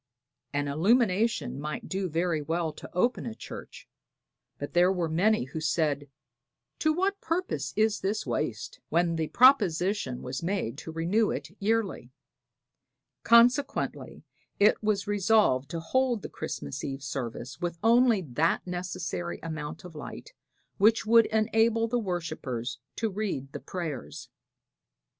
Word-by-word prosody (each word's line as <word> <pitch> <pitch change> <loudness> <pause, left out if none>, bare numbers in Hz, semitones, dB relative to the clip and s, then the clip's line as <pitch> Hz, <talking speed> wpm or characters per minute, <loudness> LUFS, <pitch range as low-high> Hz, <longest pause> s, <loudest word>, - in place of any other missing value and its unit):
An 145 0 -1
illumination 200 - +2
might 150 0 -5
do 190 -1 -2
very 165 0 0
well 160 +1 -1
to - - -10
open 240 +9 0
a 225 - -5
church, - - -10 0.7
but - - -6
there 180 +2 +5
were 180 -3 0
many 185 - +2
who 135 +5 -6
said 150 -3 0 0.7
"to 310 - +3
what 385 +5 0
purpose 325 - -2
is 215 0 +2
this 205 +3 -2
waste?" 115 -3 -3
when 170 +1 +2
the 160 -1 -1
proposition 200 - +3
was 130 +1 -4
made 170 - -2
to 160 - -7
renew 180 +7 +1
it - - -4
yearly. 205 - -1 1.1
Consequently 240 +4 +3 0.4
it 205 +1 +4
was 210 -2 0
resolved 205 - +2
to 165 - -3
hold 245 +5 0
the - - -5
Christmas 70 -1 -5
Eve 135 0 -5
service 130 -1 -5
with 175 -1 -2
only 230 -3 +5
that 155 +4 0
necessary 175 - -4
amount 155 -2 -5
of 180 - -10
light 150 - -9 0.5
which 220 +3 +4
would 230 +1 +6
enable 225 +1 +2
the 240 +1 0
worshipers 150 - -4 0.2
to 225 -2 -1
read 190 -10 -3
the - - -5
prayers. 165 -8 -6
180 Hz, 135 wpm, -28 LUFS, 150-220 Hz, 1.1 s, would